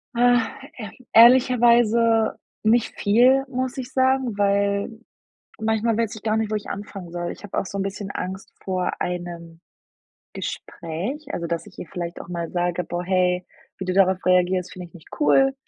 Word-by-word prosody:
Äh, 245 Hz, +1 st, +5 dB, 0.4 s
ehrl 215 Hz, -5 st, -7 dB, 0.2 s
ehrlicherweise 235 Hz, -2 st, +5 dB, 0.3 s
nicht 225 Hz, +1 st, +2 dB
viel, 250 Hz, +6 st, +4 dB
muss 255 Hz, 0 st, -3 dB
ich 260 Hz, -1 st, -6 dB
sagen, 260 Hz, -4 st, +1 dB
weil 200 Hz, 0 st, +1 dB, 0.7 s
manchmal 220 Hz, 0 st, 0 dB
weiß 225 Hz, -2 st, -1 dB
ich 220 Hz, -, -10 dB
gar 215 Hz, 0 st, 0 dB
nicht, 220 Hz, -1 st, -1 dB
wo 215 Hz, -, 0 dB
ich 210 Hz, -, -4 dB
anfangen 195 Hz, -3 st, -7 dB
soll. 175 Hz, 0 st, -3 dB
Ich -, -, -11 dB
habe 205 Hz, -, -6 dB
auch -, -, 0 dB
so 200 Hz, -, -6 dB
'n 195 Hz, -, -1 dB
bisschen 195 Hz, +1 st, -4 dB
Angst 190 Hz, +1 st, -6 dB
vor 185 Hz, -1 st, -1 dB
einem 170 Hz, -2 st, -5 dB, 0.7 s
Gespräch. 215 Hz, -, -5 dB
Also, 170 Hz, -, -3 dB
dass 170 Hz, +3 st, -3 dB
ich 190 Hz, -, -16 dB
ihr -, -, -6 dB
vielleicht 175 Hz, -2 st, -6 dB
auch -, -, -9 dB
mal 170 Hz, -2 st, -4 dB
sage: 175 Hz, 0 st, -1 dB
„Boah, 175 Hz, +1 st, -4 dB
hey, 180 Hz, 0 st, +1 dB, 0.3 s
wie 190 Hz, -, -4 dB
du 185 Hz, -, -1 dB
darauf 190 Hz, -1 st, +3 dB
reagierst, 180 Hz, 0 st, +2 dB
finde 180 Hz, -1 st, -8 dB
ich -, -, -33 dB
nicht 170 Hz, -, -15 dB
cool. 270 Hz, -2 st, +4 dB
200 Hz, 175 wpm, -23 LUFS, 180-235 Hz, 0.7 s, Äh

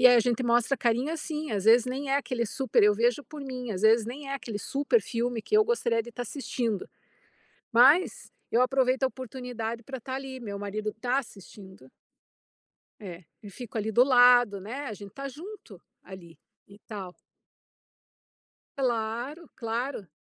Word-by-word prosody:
e -, -, +11 dB
a 245 Hz, -1 st, +7 dB
gente 245 Hz, +1 st, 0 dB
mostra 240 Hz, +3 st, +2 dB
carinho 245 Hz, +6 st, 0 dB
assim, 310 Hz, -2 st, -4 dB
às 205 Hz, -2 st, -2 dB
vezes 235 Hz, +2 st, +6 dB
nem 270 Hz, +2 st, -3 dB
é 275 Hz, -, +4 dB
aquele 250 Hz, -5 st, -1 dB
super 260 Hz, 0 st, +1 dB
eu 210 Hz, 0 st, +6 dB
vejo 240 Hz, +5 st, +1 dB
por 305 Hz, -1 st, -10 dB
mim, 250 Hz, -3 st, -6 dB
às 185 Hz, 0 st, -5 dB
vezes 220 Hz, 0 st, +5 dB
nem 275 Hz, +3 st, -7 dB
é 275 Hz, -, -2 dB
aquele 230 Hz, -6 st, -5 dB
super 285 Hz, -, +1 dB
filme 235 Hz, -2 st, -2 dB
que 425 Hz, -, +1 dB
eu 430 Hz, -, +6 dB
gostaria 235 Hz, -, +1 dB
de 240 Hz, -, -11 dB
estar 245 Hz, -, -5 dB
assistindo. 240 Hz, -4 st, -3 dB, 0.8 s
Mas, 270 Hz, +10 st, +4 dB, 0.2 s
eu 235 Hz, -, +4 dB
aproveito 260 Hz, 0 st, +2 dB
a -, -, +5 dB
oportunidade 245 Hz, -3 st, -6 dB
pra 265 Hz, +3 st, -6 dB
estar 260 Hz, +2 st, -7 dB
ali, 265 Hz, -1 st, -6 dB
meu 205 Hz, -4 st, -6 dB
marido 210 Hz, +1 st, -3 dB
tá 245 Hz, +4 st, -1 dB
assistindo 195 Hz, -, -9 dB, 1.1 s
É. 180 Hz, -4 st, -9 dB, 0.2 s
E 205 Hz, -, -10 dB
fico 230 Hz, +2 st, -8 dB
ali 220 Hz, +1 st, -1 dB
do 240 Hz, +4 st, +6 dB
lado, 245 Hz, -5 st, +6 dB
né. 255 Hz, +9 st, -6 dB
A 220 Hz, -, -4 dB
gente 200 Hz, -1 st, -11 dB
tá 275 Hz, 0 st, -6 dB
junto 310 Hz, -, -11 dB, 0.2 s
ali, 175 Hz, -3 st, -12 dB, 0.3 s
e 200 Hz, +1 st, -16 dB
tal. 195 Hz, -5 st, -8 dB, 1.6 s
Claro, 245 Hz, +5 st, -2 dB
claro. 230 Hz, -2 st, -3 dB
240 Hz, 170 wpm, -28 LUFS, 215-265 Hz, 1.6 s, e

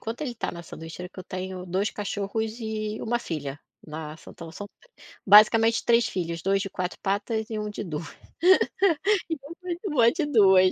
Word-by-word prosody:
enquanto 225 Hz, +4 st, -5 dB
ele 295 Hz, -4 st, -2 dB
está 235 Hz, -, -4 dB
na 170 Hz, 0 st, -8 dB
sanduicheira, 165 Hz, +2 st, -8 dB
que -, -, -14 dB
eu 185 Hz, -, -7 dB
tenho 185 Hz, 0 st, -6 dB
2 190 Hz, +4 st, 0 dB
cachorros 215 Hz, +2 st, -3 dB
e 215 Hz, -1 st, -3 dB
1 240 Hz, +1 st, 0 dB
filha 145 Hz, -9 st, -5 dB, 0.3 s
na 155 Hz, 0 st, -7 dB
são -, -, -13 dB
tão 165 Hz, -1 st, -10 dB
são 205 Hz, +5 st, -8 dB, 0.6 s
basicamente 225 Hz, +3 st, +6 dB
3 235 Hz, 0 st, +4 dB
filhos, 170 Hz, -2 st, -3 dB
2 195 Hz, +1 st, +2 dB
de 195 Hz, -, -5 dB
4 180 Hz, -1 st, -4 dB
patas, 215 Hz, +3 st, -1 dB
e 220 Hz, -, -3 dB
1 210 Hz, 0 st, -3 dB
de 210 Hz, -, -5 dB
2, 160 Hz, -2 st, -5 dB, 2.1 s
de 330 Hz, -, 0 dB
2 190 Hz, -8 st, +6 dB
195 Hz, 170 wpm, -26 LUFS, 175-220 Hz, 2.1 s, basicamente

